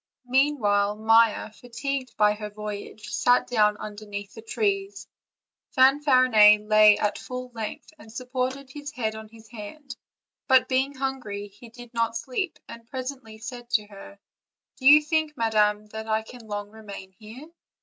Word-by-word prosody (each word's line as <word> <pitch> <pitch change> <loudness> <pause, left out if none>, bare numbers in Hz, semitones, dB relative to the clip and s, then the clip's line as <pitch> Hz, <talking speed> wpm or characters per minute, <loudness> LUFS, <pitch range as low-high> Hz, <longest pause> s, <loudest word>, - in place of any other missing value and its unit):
Meanwhile 235 -7 +2
Maia, 225 0 +3
fatigued 255 +3 -5
by 210 -1 +4
her 210 0 -7
voyage, 210 -1 -8
sat 245 0 +3
down 210 -3 +2
under 210 0 -8
the 205 +1 -8
trees; 395 - -2 0.7
Fanfarinet 255 -6 +5
lay 215 -1 +6
at 210 - -1
full 250 0 -7
length, 230 +8 -6
and 225 - -14
sup 250 +2 -9
ported 260 +1 -3
his 290 0 -7
head 220 -5 -2
on 220 0 -9
his 225 0 -16
hand, 245 +5 -9 0.5
but, 260 -1 +5
being 265 +2 0
hungry, 245 -7 -4
he 205 +4 -15
did 240 +1 -13
not 230 0 0
sleep, 325 +8 -4
and 230 0 -11
presently 255 -4 -6
said 240 +2 -9
to 210 - +1
her: 200 -1 -13 0.6
"Do 260 - 0
you 300 +2 +9
think, 310 -1 -1
madam, 215 -2 +2
that 220 +1 -7
I 220 0 0
can 235 0 -13
long 205 -1 -5
remain 200 -3 -10
here? 220 +9 -12
230 Hz, 155 wpm, -25 LUFS, 210-260 Hz, 0.7 s, you